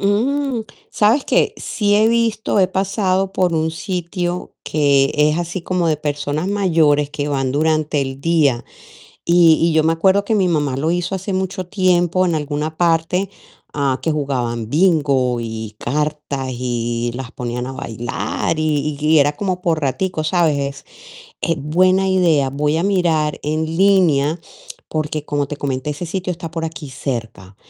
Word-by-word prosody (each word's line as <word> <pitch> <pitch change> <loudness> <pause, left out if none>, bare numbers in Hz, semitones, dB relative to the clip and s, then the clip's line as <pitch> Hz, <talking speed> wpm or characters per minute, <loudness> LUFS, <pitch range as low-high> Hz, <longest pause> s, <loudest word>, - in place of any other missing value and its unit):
Mm, 245 +5 0 0.3
¿sabes 225 +7 +2
qué? - - +2
Sí 205 -2 0
he 215 +2 +4
visto, 230 -2 +1
he 190 - +5
pasado 190 0 0
por 180 -2 +1
un 160 0 0
sitio 175 +1 -4
que 140 -2 +2
es 150 +2 +2
así 175 +1 -4
como 180 -1 0
de 155 -2 +2
personas 145 +3 -2
mayores 160 -8 +2
que 145 -1 -3
van 135 -2 -1
durante 155 0 +1
el 135 0 -4
día. 145 -7 +2 0.6
Y 170 -1 +6
y 165 0 +3
yo 155 0 +3
me 160 - +3
acuerdo 190 +4 +3
que 225 - +1
mi 190 -3 +2
mamá 145 -6 0
lo 155 +4 0
hizo 175 +2 -1
hace 190 +1 -4
mucho 190 0 -2
tiempo 185 -1 +2
en 170 - 0
alguna 150 +1 -3
parte, 175 +3 +1 0.4
a, 140 -3 0
que 160 - 0
jugaban 125 -6 -2
bingo 140 -6 +2
y 110 -2 -6
cartas, 150 -1 -2
y 120 -1 -2
las 125 0 -6
ponían 125 0 -4
a 135 - -5
bailar 120 +4 -3
y 150 -1 0
y 155 +1 +4
era 145 0 +3
como 185 +1 -3
por 165 -3 +1
raticos, 155 +3 -1
¿sabes? 165 -5 +2
Es 140 0 -4 0.7
es 165 - -1
buena 185 +5 +3
idea. 165 -8 +3
Voy 150 +3 0
a - - 0
mirar 170 -6 +1
en 155 +2 0
línea, 175 -5 +3 0.5
porque 155 -1 -3
como 145 -1 -1
te 150 - -6
comenté, 140 0 -3
ese 150 +4 -5
sitio 185 +1 -3
está 165 -1 -7
por 165 0 -4
aquí 160 -2 -6
cerca, 115 -8 -5
155 Hz, 165 wpm, -19 LUFS, 140-185 Hz, 0.7 s, Y